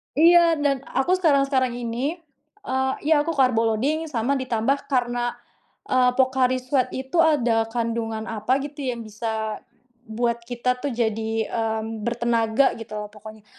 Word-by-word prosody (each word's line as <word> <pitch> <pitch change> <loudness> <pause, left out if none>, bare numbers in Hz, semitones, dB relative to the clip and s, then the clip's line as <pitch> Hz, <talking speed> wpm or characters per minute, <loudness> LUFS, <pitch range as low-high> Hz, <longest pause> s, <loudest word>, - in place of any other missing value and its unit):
Iya 335 +1 +6
dan 275 -2 +2
aku 270 +7 0
sekarang-sekarang 275 -6 +2
ini, 245 +6 -2 0.5
eee 265 -4 0
iya 310 0 +4
aku 330 +2 -1
karbo 250 -4 +3
loading 310 +8 -1
sama 265 +1 0
ditambah 255 +2 -1
karena, 240 -2 0 0.5
eee, 255 -1 +3
Pocari 260 -1 +2
Sweat 255 0 0
itu 265 +6 -2
ada 240 -9 +3
kandungan 225 -1 -2
apa 225 +3 -1
gitu, 290 +1 -8
yang 240 -2 -3
bisa 220 0 -4 0.5
buat 235 +1 -1
kita 250 +1 -1
tuh 285 -1 -3
jadi, 225 -1 -1
mmm, 220 -1 -2
bertenaga 235 +1 +2
gitu 220 -1 -8
lah 210 0 -6
pokoknya. 215 0 -12
245 Hz, 140 wpm, -23 LUFS, 225-270 Hz, 0.5 s, Iya